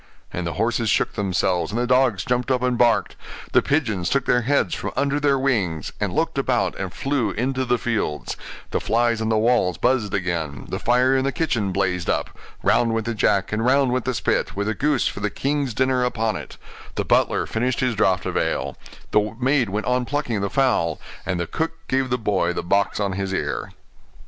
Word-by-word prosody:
And 90 -1 -3
the 85 - -3
horses 115 +1 0
shook - - +1
themselves, 90 -3 0
and 115 - -1
the 120 - +1
dogs 125 -6 +2
jumped 125 +1 0
up 125 -1 +1
and 125 -1 +2
barked; 120 -1 +2 0.4
the - - +5
pigeons 110 - 0
took 140 -2 +1
their 125 - +3
heads 140 +4 +1
from - - -3
under 140 +1 +1
their 140 -2 +3
wings, 100 - -1
and - - -1
looked - - 0
about - - +1
and - - -3
flew 135 -6 -1
into 130 +5 -1
the 125 0 +2
fields; 110 -11 -2 0.4
the - - 0
flies 115 0 +1
on 110 - 0
the 110 - +2
walls 110 -7 +2
buzzed 120 -5 +1
again; 85 -7 -2
the - - -3
fire 125 +2 +3
in 130 - +2
the 135 - 0
kitchen 120 - -1
blazed 90 -2 -1
up; - - 0 0.3
round 115 -1 +3
went 110 -1 -1
the 115 - -1
jack, 100 -2 +1
and 110 +1 0
round 130 +1 +3
went 130 -1 -1
the 130 -1 -1
spit, 120 - 0
with 100 +1 -1
the 110 - 0
goose 145 +3 +1
for - - -4
the 105 0 -1
king's 140 +1 -1
dinner 130 0 +2
upon 115 -3 0
it; - - -8 0.4
the - - -1
butler - - +2
finished 120 +2 -1
his 130 -2 +1
draught 95 -3 +1
of - - -3
ale; - - -1 0.4
the 105 +1 +1
maid 130 -3 +2
went 105 +3 -2
on 125 0 +1
plucking 125 -6 -2
the 100 - -1
fowl; 100 - +1 0.3
and 90 - -1
the 85 - -1
cook 160 - -2
gave 130 0 0
the 125 - +1
boy 100 -6 0
the - - -3
box 100 +3 +1
on 100 -2 0
his 95 0 -3
ear. 95 - -2
115 Hz, 215 wpm, -23 LUFS, 100-130 Hz, 0.4 s, the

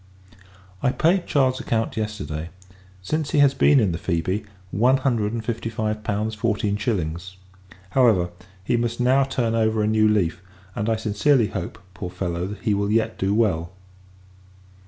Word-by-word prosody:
I 125 - +2
paid 175 +6 +2
Charles's 130 -2 +2
account, 115 -1 -1
yesterday; 85 -8 -4 0.5
since 155 +9 -2
he - - 0
has 140 -2 +5
been 140 +1 +5
in 105 -6 +2
the 85 - -4
Phoebe, 95 +4 -1 0.3
one 125 +7 +3
hundred 120 -6 0
and 115 -1 -4
fifty 115 -1 -3
five 110 -1 -3
pounds, 105 +1 -1
fourteen 105 -1 0
shillings. 95 -4 -3 0.5
However, 105 -9 +3 0.3
he 120 - +1
must 120 0 -2
now 130 +3 +4
turn 125 -4 -1
over 110 -1 +1
a - - +1
new 110 0 +3
leaf; 95 -5 +1 0.3
and 105 +2 -2
I 115 - +2
sincerely 110 +3 +2
hope, 90 -4 -5 0.2
poor 95 -1 -6
fellow, 90 +2 -3
he 110 -3 +2
will 100 +1 0
yet 115 0 0
do 95 +1 +1
well. 95 -6 +1
110 Hz, 160 wpm, -23 LUFS, 95-120 Hz, 0.5 s, has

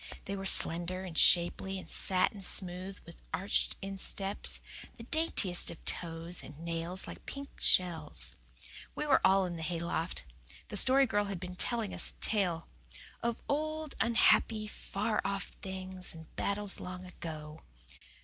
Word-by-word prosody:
They 200 - -3
were 195 0 -4
slender 175 +2 +2
and 180 -4 -7
shapely 180 +3 +4
and 185 - -8
satin 190 +2 +1
smooth 185 +1 +4
with 170 - -13
arched 195 +2 +1
insteps, 195 0 -1 0.4
the 230 - -9
daintiest 230 - +3
of 170 - -10
toes, 165 0 -2
and 145 - -11
nails 170 +3 -4
like - - -10
pink 280 0 -8
shells. 85 - +1 0.6
We 300 - -2
were 280 -3 +4
all 190 0 +5
in 175 -2 -4
the - - -6
hayloft. 170 +1 -2 0.5
The 205 - -3
Story 270 +5 +5
Girl 205 -4 +1
had 200 -3 -4
been 180 0 -6
telling 225 +1 +1
us - - +1
a - - -27
tale 180 -6 +1 0.5
"Of 235 -1 -2
old, 310 +1 -2
unhappy, 225 -2 +4
far 215 +1 -2
off 195 -1 -2
things, 185 -2 -4
And 160 -1 -13
battles 200 0 -2
long 180 0 -7
ago." 155 -3 -8
190 Hz, 150 wpm, -32 LUFS, 170-205 Hz, 0.6 s, all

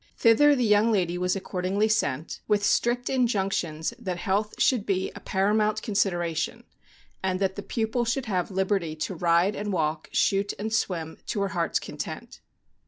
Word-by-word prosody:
Thither 285 +6 +5
the 250 -3 +1
young 210 +2 +4
lady 180 -5 +1
was 180 +1 +1
accordingly 190 +2 -1
sent, 160 -9 -1
with 205 -1 +2
strict 240 +4 +1
injunctions 195 -9 0
that 185 -7 -3
health 200 +4 -1
should 250 -6 +3
be 190 -2 -1
a - - -9
paramount 210 +2 +1
consid 205 -3 +1
eration, 170 -2 -2 0.6
and 185 -1 -1
that 190 -1 0
the 200 - -5
pupil 225 +3 -1
should 240 +3 -1
have 185 -5 -1
liberty 190 -4 0
to 160 +5 -3
ride 175 +3 +2
and 205 0 -3
walk, 155 -3 -1
shoot 200 +1 +1
and 220 +2 -4
swim, 165 -6 -2
to 205 - -1
her 200 - 0
heart's 170 -2 0
content. - - -7
195 Hz, 170 wpm, -26 LUFS, 180-215 Hz, 0.6 s, Thither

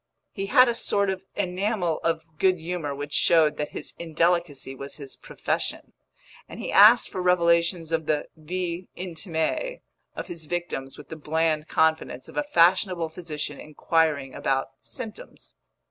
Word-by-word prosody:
He 195 -1 -4
had 255 +3 +6
a 240 - +2
sort 200 -3 +1
of 190 -1 -4
enamel 185 -2 -1
of 165 -1 0 0.2
good 185 -1 +4
humour 160 -3 -4
which 145 +1 -6
showed 160 -3 +4
that 150 - -2
his - - -6
indelicacy 165 -4 0
was 140 +1 -7
his 140 -4 -10
profession; - - -4 0.6
and - - -9
he - - -4
asked 215 +4 +8
for 185 - -4
revelations 170 -2 +2
of 160 -1 -1
the 150 -1 0
vie 175 +2 -4
intime 180 - -3 0.3
of - - -5
his 170 -2 -9
victims 150 -5 -4
with 150 - -12
the 160 - -6
bland 155 0 0
confidence 160 -5 +1
of - - -13
a - - +2
fashionable 180 - +3
physician 155 -4 -6
inquiring 155 -3 0
about 135 +1 -1
symptoms. 225 -5 -10
165 Hz, 150 wpm, -26 LUFS, 155-185 Hz, 0.6 s, asked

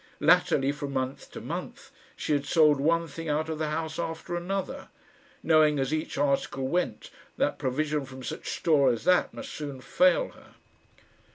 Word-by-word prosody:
Latterly, 135 +1 +4
from 145 -1 -5
month 130 0 -3
to - - -8
month, - - -7 0.2
she - - -1
had 145 0 0
sold 150 -3 +5
one 165 +3 +2
thing 165 +2 -6
out 155 +2 0
of 155 -1 -3
the 155 -1 -1
house 160 +1 -3
after 165 +1 -4
another, 185 +2 -4 0.5
knowing 155 -2 +4
as 135 +2 -1
each 155 +1 -3
article 140 -1 0
went 175 +6 -2 0.3
that - - 0
provision 145 +2 -1
from 130 0 -10
such - - -6
store 150 -5 +3
as 115 - -3
that 180 +2 +3
must - - -8
soon 145 -3 -6
fail 275 - +3
her. - - -19
150 Hz, 170 wpm, -28 LUFS, 140-165 Hz, 0.5 s, sold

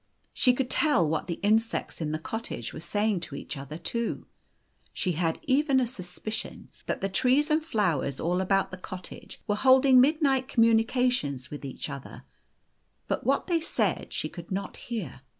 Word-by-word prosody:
She 250 -2 +4
could 255 -1 -2
tell 290 - +3
what 160 +3 -1
the 170 - -3
insects 220 -2 +1
in 150 -1 -1
the 155 - -1
cottage 160 - -5
were - - -6
saying 205 +4 0
to 165 -4 -7
each - - -6
other 140 +2 -7
too. 235 +7 -2 0.7
She 185 - -1
had 165 -1 -1
even 275 -1 +3
a 255 - +2
suspicion 215 0 -6 0.2
that - - -2
the 195 - +1
trees 260 +10 +2
and 310 +1 +3
flowers 175 - 0
all 175 +3 0
about 195 +1 +1
the 185 - -6
cottage 185 0 -9
were 205 - +1
holding 260 +3 +6
midnight 275 -2 +3
communications 230 - +2
with 145 0 -7
each 135 -2 -5
other; 140 -1 -8 0.8
but - - -2
what - - +3
o 360 - -3
they 330 - +3
said 330 - 0
she - - -2
could 170 -2 -10
not 195 +1 -3
hear. 180 - -6
210 Hz, 175 wpm, -28 LUFS, 170-255 Hz, 0.8 s, holding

